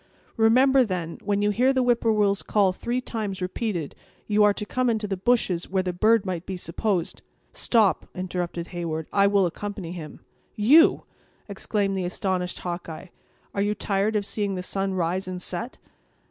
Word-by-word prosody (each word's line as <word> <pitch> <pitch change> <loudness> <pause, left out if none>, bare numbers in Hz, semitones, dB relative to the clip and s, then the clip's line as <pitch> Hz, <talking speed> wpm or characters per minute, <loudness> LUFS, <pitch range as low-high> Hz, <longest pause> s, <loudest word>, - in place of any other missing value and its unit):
Remember, 255 +4 +5
then, 180 -6 -4
when 205 0 0
you 210 - +3
hear 250 +5 +3
the 260 -1 +1
whip 240 -1 +2
poor 225 - +2
will's 205 -2 +2
call 200 -3 +2
three 240 +6 -2
times 215 -6 -4
repeated, 185 -3 -3 0.3
you 210 0 +3
are 210 - +6
to 210 - -4
come 255 +3 0
into 220 -2 -1
the 195 - -2
bushes 190 -4 +1
where 190 0 0
the 180 -1 -2
bird 215 +3 +3
might 180 -3 -3
be 190 - -4
supposed—" 175 0 -2 0.3
"Stop," 215 -7 +2
interrupted 175 -2 -4
Heyward; 165 -3 -4
"I 200 0 +5
will 200 -1 +3
accompany 195 0 -5
him." 165 -4 -8 0.3
"You!" 285 +11 +5 0.4
exclaimed 200 0 -1
the 185 -2 -2
astonished 180 0 -2
Hawkeye; 175 0 -6 0.4
"are 200 - -1
you 205 +1 0
tired 205 +1 0
of 205 -1 0
seeing 205 -1 -2
the 180 - -4
sun 195 +1 -2
rise 180 +2 -1
and 185 -1 -4
set?" 185 +7 -5
200 Hz, 175 wpm, -25 LUFS, 180-215 Hz, 0.4 s, are